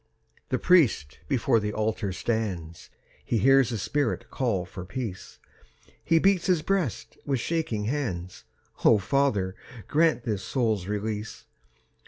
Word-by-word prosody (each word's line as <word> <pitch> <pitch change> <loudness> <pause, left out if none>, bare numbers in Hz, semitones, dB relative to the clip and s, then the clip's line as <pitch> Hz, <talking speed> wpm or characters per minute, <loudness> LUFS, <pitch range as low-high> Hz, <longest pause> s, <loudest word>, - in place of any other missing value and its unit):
The - - +1
priest 145 - +3
before 125 -3 +2
the 105 0 -3
altar 110 -1 -1
stands, 95 -6 -3 0.3
He 120 - 0
hears 135 +3 +5
the 115 - -2
spirit 140 +5 -2
call 110 -9 -1
for 90 0 -8
peace; 100 -2 -6 0.7
He 165 - +3
beats 185 +1 +3
his 175 -4 +2
breast 190 - -2
with 135 -3 -1
shaking 140 -8 -1
hands. 105 -9 -3 0.4
"O 110 - +6
Father, 100 -3 0 0.3
grant 155 -6 +2
this 105 -5 -2
soul's 110 -8 -1
release. 105 +1 -4
115 Hz, 130 wpm, -27 LUFS, 100-140 Hz, 0.7 s, O